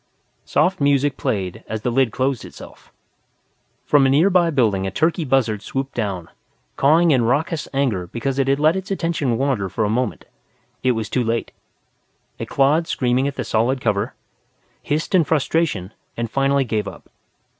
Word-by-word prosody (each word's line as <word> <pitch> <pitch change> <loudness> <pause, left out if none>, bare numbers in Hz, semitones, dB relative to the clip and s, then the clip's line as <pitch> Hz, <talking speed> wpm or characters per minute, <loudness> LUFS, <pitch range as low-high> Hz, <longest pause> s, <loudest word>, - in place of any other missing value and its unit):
Soft 185 -3 +1
music 140 -1 +2
played 95 -4 -3
as 110 -1 -5
the 125 - 0
lid 130 -1 +2
closed 130 -2 -1
itself. - - -13 0.9
From 140 -2 +4
a 150 +8 +4 0.2
building 115 -10 +1
nearby 95 - -2
a - - -11
turkey 160 - +1
buzzard 125 -7 +1
swooped 135 +4 -4
down, 95 -7 -3 0.5
cawing 160 +4 +4
in 130 -4 +3
raucous 150 +5 0
anger 125 -11 -1
because 130 +7 -3
it 135 - +1
had 135 +1 +2
let 155 +3 +4
its 190 0 -5
attention 165 - -1
wander 130 -8 0
for 110 +4 -1
a - - -1
moment. 125 0 -2 0.6
It 130 -1 +2
was 110 -2 -3
too 125 - 0
late. 115 0 -2 0.9
It - - -4
clawed 150 +5 +2
screaming 130 -1 +1
at 140 - -4
the - - -3
solid 120 +4 0
cover, 105 -4 -1 0.7
hissed 150 +5 -2
in 180 -3 +5
frustration 145 - 0 0.2
and 115 -1 -3
finally 135 0 +2
gave 110 -4 -2
up. - - -10
135 Hz, 165 wpm, -21 LUFS, 115-145 Hz, 0.9 s, in